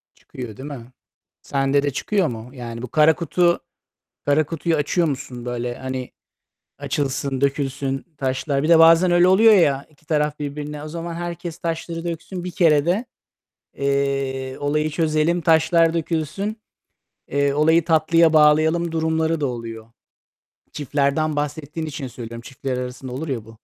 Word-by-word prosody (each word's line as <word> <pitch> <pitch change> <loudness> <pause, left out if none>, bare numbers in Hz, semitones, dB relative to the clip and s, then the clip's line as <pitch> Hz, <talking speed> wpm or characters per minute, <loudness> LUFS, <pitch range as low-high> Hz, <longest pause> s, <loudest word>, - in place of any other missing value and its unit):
Çıkıyor 120 -5 -9
değil 135 +3 -7
mi? 125 -4 -9 0.5
Sende 140 0 +1
de 145 - 0
çıkıyor 190 +6 0
mu? 115 0 -7
Yani, 115 -2 -7
bu 125 - -5
kara 155 0 +5
kutu 175 0 +1 0.7
kara 145 +1 +3
kutuyu 165 +1 -1
açıyor 160 +3 +1
musun 130 -4 -5
böyle, 120 0 -3
hani, 130 -1 -5 0.7
açılsın, 135 -1 -2
dökülsün 135 -1 -1
taşlar. 135 +1 -1
Bir 155 - 0
de 165 -1 +7
bazen 165 +2 +6
öyle 175 +1 +5
oluyor 215 +4 +6
ya, 145 -7 +3
iki 155 0 -28
taraf 150 -2 0
birbirine 145 +1 -5
"O - - -6
zaman 170 +1 -5
herkes 175 -1 -5
taşları 165 0 -4
döksün 175 +2 -5
bir 180 - -5
kerede, 170 - +2 0.7
eee, 140 -1 -1
olayı 150 +2 0
çözelim, 160 +2 +1
taşlar 165 +1 +3
dökülsün, 165 +6 -2 0.7
eee, 140 0 +1
olayı 160 +2 +4
tatlıya 165 0 +4
bağlayalım." 160 +2 +4
durumları 160 0 0
da 140 - +1
oluyor. 115 -2 -6 0.9
Çiftlerden 145 +2 0
bahsettiğin 150 +2 -4
için 145 -2 -5
söylüyorum. 115 -1 -8
Çiftler 135 0 -5
arasında 125 0 -6
olur 150 +6 -5
ya, 120 -6 -3
bu. 115 0 -15
150 Hz, 145 wpm, -22 LUFS, 135-165 Hz, 0.9 s, de